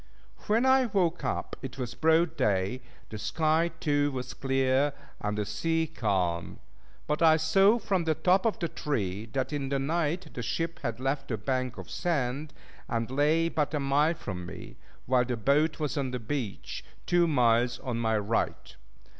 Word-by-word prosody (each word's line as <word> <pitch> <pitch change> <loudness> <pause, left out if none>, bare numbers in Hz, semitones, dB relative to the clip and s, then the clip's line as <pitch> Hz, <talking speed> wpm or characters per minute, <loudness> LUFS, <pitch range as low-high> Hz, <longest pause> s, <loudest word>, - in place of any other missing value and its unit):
When 225 +4 +3
I 260 -1 +5
woke 180 -5 0
up - - -2
it 135 -1 -7
was 125 -3 -4
broad 160 +1 +3
day; 100 +3 0 0.3
the 110 - -6
sky 155 +9 +1
too 145 -1 +1
was 130 -1 -5
clear 135 +1 +1 0.3
and 105 0 -2
the 105 - -1
sea 160 +11 0
calm. 95 - -1 0.5
But 150 +2 -1
I 160 -1 +6
saw 195 +8 +4
from 190 -7 -1
the 160 -1 +2
top 185 +6 +3
of 220 - 0
the 170 - -1
tree 110 - -3
that 135 +2 -1
in 140 -2 -2
the 140 - +1
night 165 +5 -1
the 125 - -4
ship 165 +7 -2
had 120 -4 -3
left 135 +1 -1
the 115 - -2
bank 130 +2 -2
of - - -8
sand, 150 -3 -1 0.4
and 115 +1 -2
lay 150 +4 +3
but 150 -2 -1
a - - 0
mile 145 +4 +2
from 95 - -6
me; 90 0 -9 0.3
while 125 0 +3
the 120 -1 -2
boat 145 +9 +2
was 150 -2 -1
on 135 -2 -1
the 125 - -3
beach, 115 -2 -4 0.2
two 175 -1 +3
miles 120 -4 +3
on 120 -3 -3
my 110 -1 +1
right. 105 +2 -2
140 Hz, 180 wpm, -29 LUFS, 120-160 Hz, 0.5 s, I